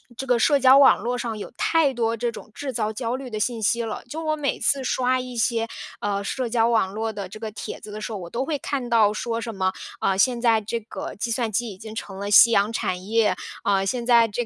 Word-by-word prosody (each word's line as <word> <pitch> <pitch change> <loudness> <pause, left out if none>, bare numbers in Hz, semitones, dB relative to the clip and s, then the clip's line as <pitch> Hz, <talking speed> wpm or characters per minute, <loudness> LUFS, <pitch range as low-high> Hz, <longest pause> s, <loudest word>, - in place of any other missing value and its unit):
这 270 +3 -6
个 245 -1 +3
社 280 +5 +3
交 260 +1 +7
网 275 -1 +7
络 245 +1 -2
上 235 -2 -3
有 - - -7
太 320 -4 +3
多 230 -2 0
这 235 +1 -2
种 220 - -11
制 285 -2 -5
造 220 -2 -2
焦 235 +1 -2
虑 260 -2 -7
的 215 - -3
信 225 +1 -1
息 235 +3 +2
了， 225 -1 -5
就 320 +6 -6
我 310 0 0
每 290 -2 -2
次 275 -1 +1
刷 255 0 +1
一 250 -1 -6
些， 230 -1 0 0.3
呃， 200 -1 -2
社 250 +3 -2
交 230 -1 +2
网 220 -5 +1
络 220 +1 -2
的 200 -3 -6
这 215 - -10
个 220 -1 -4
帖 210 - -7
子 210 - -10
的 215 - -7
时 225 - -5
候， 210 - -4
我 175 -2 -8
都 245 +7 -2
会 305 -1 -1
看 265 -4 -3
到 220 -3 +4
说 230 +1 -3
什 230 -1 -5
么， 190 0 +1 0.3
呃， 190 -1 +1
现 240 +2 +2
在 230 -2 +4
这 230 +3 -3
个 215 - -7
计 230 +3 -3
算 230 -1 -1
机 235 +3 -1
已 195 - -9
经 220 +2 -9
成 195 -4 -6
了 200 +1 -3
夕 230 +3 +8
阳 205 0 +3
产 180 -2 -2
业， 215 -3 +2 0.3
呃， 195 -1 +2
现 240 +3 -2
在 235 -2 +5
这 230 +3 -3
230 Hz, 280 characters per minute, -24 LUFS, 210-250 Hz, 0.3 s, 夕